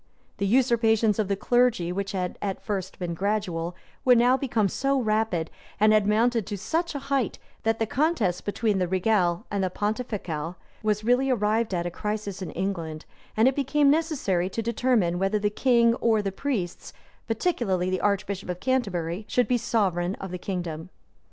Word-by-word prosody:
The 200 - 0
usurpations 225 -2 +3
of 215 - +1
the 200 - 0
clergy, 240 -5 +2
which 195 +2 -3
had 180 -2 -3
at 195 -2 -3
first 190 -3 -3
been 175 -2 -3
gradual, 180 -3 -2 0.3
were 250 -1 +6
now 245 +2 +5
become 240 -6 +1
so 275 +6 0
rapid, 215 -8 0 0.3
and 215 +1 +5
had 210 -1 +3
mounted 225 0 +2
to 205 - -4
such 325 - -2
a 275 -1 -5
height, 265 -4 0 0.2
that 225 0 +1
the 225 - 0
contest 240 - 0
between 205 -1 0
the 180 - +1
regale 185 0 +1
and 200 -1 0
pontificale 205 -7 -3 0.3
was 215 0 0
really 250 +4 +3
arrived 220 -2 +1
at 170 0 -1
a 175 - -2
crisis 210 0 -4
in 185 - -4
England; 165 -5 -4 0.3
and 225 +3 +5
it 265 - +2
became 285 +1 +3
necessary 280 - 0
to 225 +4 -3
determine 225 -6 +1
whether 195 +2 +1
the 205 0 0
king 235 0 +4
or 225 -3 +1
the 195 - -1
priests, 195 -5 -3 0.3
particularly 220 - 0
the 185 - -1
archbishop 200 -2 -1
of 180 0 -3
Canterbury, 195 -8 -1
should 250 - +1
be 245 -1 +2
sovereign 195 -6 0
of 195 -2 -7
the 180 - -5
kingdom. 175 -3 -4
210 Hz, 175 wpm, -26 LUFS, 185-240 Hz, 0.3 s, were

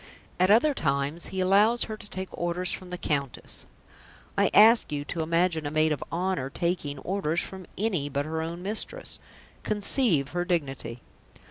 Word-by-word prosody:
At 185 +1 +4
other 240 +8 +5
times 140 - -1
he 190 -1 -3
allows 205 +6 +4
her 220 - -5
to 205 - -11
take 190 0 -6
orders 175 +1 -2
from 185 - -5
the 180 - -5
Countess; 140 -6 -3 0.7
I - - +3
ask 225 -1 +6
you 145 -1 -3
to 165 +2 -3
imagine 165 -1 +1
a - - -1
maid 155 +1 +2
of 145 - -2
honour 175 -5 -1
taking 170 -3 -2
orders 170 +1 -1
from 190 -2 -8
any 185 -9 -1
but 140 0 -2
her 160 +1 -3
own 170 +2 -5
mistress. 220 - -2 0.4
Conceive 205 - +3
her 175 +1 -1
dignity! 140 -8 -3
175 Hz, 165 wpm, -27 LUFS, 150-195 Hz, 0.7 s, ask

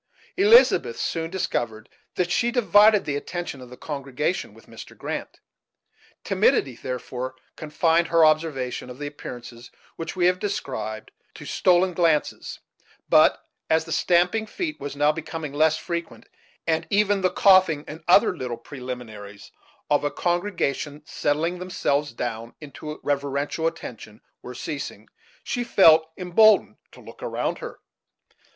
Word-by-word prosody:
Elizabeth 460 +3 +5
soon 165 -1 -2
discovered 120 -11 -3 0.3
that 175 -1 -1
she 235 +6 +2
divided 215 -3 +5
the 145 - -2
attention 160 -2 -5
of 125 - -11
the 125 - -12
congregation 145 +3 -3
with - - -18
Mr. - - -12
Grant. - - -6 0.8
Timidity, 195 - +2
therefore, 125 +1 -5 0.2
confined 165 +2 +1
her 165 -1 +5
observation 150 -6 0
of 125 - -9
the 145 - -6
appearances 120 -4 -9 0.3
which 165 0 -5
we 180 -1 +1
have 180 +1 +3
described 130 - -4 0.2
to - - -10
stoles 180 0 +2
glances; 165 -3 0 0.5
but, - - +4 0.2
as 160 0 +2
the - - -9
stamping 180 +5 +2
of - - -18
feet 320 - -4
was 145 0 -6
now 145 +1 +3
becoming 160 -1 -6
less 155 +1 +3
frequent, 170 -1 -5 0.4
and 160 -1 0
even 205 -1 +2
the 185 - +3
coughing, 185 -6 +4
and 155 +2 -9
other 180 +1 +5
little 125 -6 -5
preliminaries 115 -6 -9 0.4
of 145 - +2
a 145 - +1
congregation 175 -5 -2
settling 160 +6 -1
themselves 150 -5 -1
down 115 -1 -5
into 150 +1 -8
reverential 145 +3 -1
attention, 115 -9 -7 0.2
were 125 - -9
ceasing, 145 +2 -6 0.4
she 245 - -2
felt 160 -8 +5
emboldened 195 +4 +4
to - - -15
look - - -14
around - - -2
her. - - -8
160 Hz, 140 wpm, -24 LUFS, 135-180 Hz, 0.8 s, Elizabeth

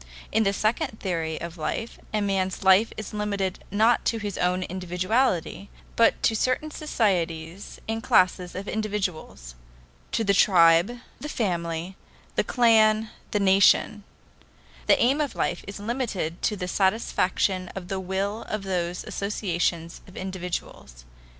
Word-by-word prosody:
In 220 - +2
the 195 -2 +3
second 215 +4 -1
theory 165 -4 -2
of 170 0 -7
life 225 +8 -4
a 215 - 0
man's 190 -2 -1
life 190 +4 +5
is 215 - -6
limited 200 -3 -2
not 220 +4 +3
to 230 - +1
his 205 -3 -4
own 180 +1 0
individuality, 185 +3 -1 0.3
but 230 - +3
to 225 - +3
certain 255 +7 0
societies 180 - -2
and 225 0 -2
classes 180 -3 +2
of 195 +2 -5
individuals: 195 - -3 0.6
to 225 - +1
the 200 -2 +3
tribe, 175 +3 +5 0.2
the 300 - -6
family, 175 - -2 0.4
the - - +2
clan, 220 -2 +3 0.2
the 210 - 0
nation; 200 +2 +4 0.8
the - - +5
aim 270 +5 +3
of 285 -5 -2
life - - -1
is 200 0 -7
limited 205 -7 -3
to 215 - 0
the 180 -2 -4
satisfaction 190 -1 +1
of 185 -2 -6
the 190 0 -3
will 195 +4 -2
of 215 -2 -3
those 180 -2 -2
associations 175 -4 -2
of 185 - -14
individuals. 180 - -6
195 Hz, 140 wpm, -25 LUFS, 180-215 Hz, 0.8 s, life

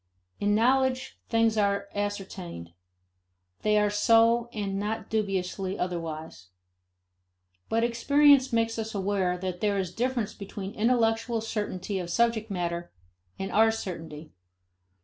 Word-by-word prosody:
In 205 0 +2
knowledge, 260 +3 +1
things 225 -1 +2
are 200 -1 +1
ascertained; 190 - -5 0.9
they 210 0 +3
are 210 0 +3
so 230 +3 +4
and 200 -3 -3
not 215 +3 -3
dubiously 195 -2 -1
otherwise. 160 - -5 1.2
But 230 +1 +1
experience 270 +3 +4
makes 230 0 +1
us 220 -1 -4
aware 190 -2 0
that 180 -1 -4
there 205 -1 +1
is 185 -2 -2
difference 240 -2 -1
between 200 0 -7
intellectual 230 0 +1
certainty 205 -3 -3
of 175 -1 -5
subject 230 +2 +1
matter 175 -2 -3 0.5
and 195 - -4
our 220 +1 +5
certainty. 165 -8 -6
210 Hz, 120 wpm, -27 LUFS, 185-230 Hz, 1.2 s, our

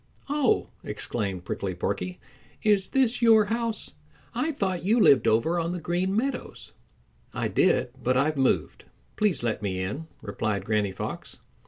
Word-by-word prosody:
"Oh!" 290 -4 +2
exclaimed 100 -3 -3
Prickly 95 0 -3
Porky, 90 0 -3 0.4
"is 205 -3 +3
this 250 -2 +2
your 225 -2 +6
house? 230 +1 -2 0.4
I 320 - 0
thought 190 - -2
you 220 +6 +3
lived 135 - +6
over 160 +11 +2
on 170 +1 -1
the 180 - -3
Green 180 +4 -1
Meadows." 250 +3 -3 0.6
"I - - 0
did, - - +2
but 130 +1 +2
I've 150 +4 +2
moved. 135 -2 0 0.3
Please 200 - +1
let 110 -3 -1
me 95 -3 -2
in," 105 +13 -4 0.2
replied 105 -3 -2
Granny 105 -2 +1
Fox. 95 - -6
165 Hz, 150 wpm, -26 LUFS, -, 0.6 s, your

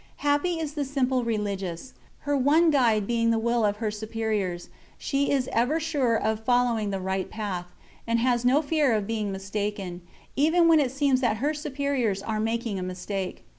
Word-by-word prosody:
Happy 290 +4 +1
is 305 -2 -3
the 295 -1 -1
simple 260 -2 0
religious. 205 -2 -3 0.3
Her 290 0 0
one 305 +5 +4
guide 230 -7 +3
being 230 +1 +1
the 230 - +2
will 235 +1 +1
of 205 -1 +2
her 215 -1 -2
superiors, 210 -4 -3 0.3
she 280 0 -1
is 270 -3 +1
ever 250 +8 +1
sure 290 -7 +1
of 220 0 -1
following 240 -3 +2
the 195 -1 -2
right 190 0 -2
path, 195 -5 -4 0.4
and 230 0 +2
has 240 0 +1
no 265 +5 +3
fear 295 -4 +2
of 210 -2 -1
being 215 -2 -2
mistaken, 195 -2 -4 0.3
even 320 +5 +4
when 325 -2 +6
it 275 -4 +2
seems 270 0 +1
that 225 -4 +1
her 290 +7 0
superiors 280 -8 -1
are 215 0 -2
making 225 -2 -1
a - - -4
mistake. 185 +1 -5
230 Hz, 180 wpm, -26 LUFS, 210-280 Hz, 0.4 s, when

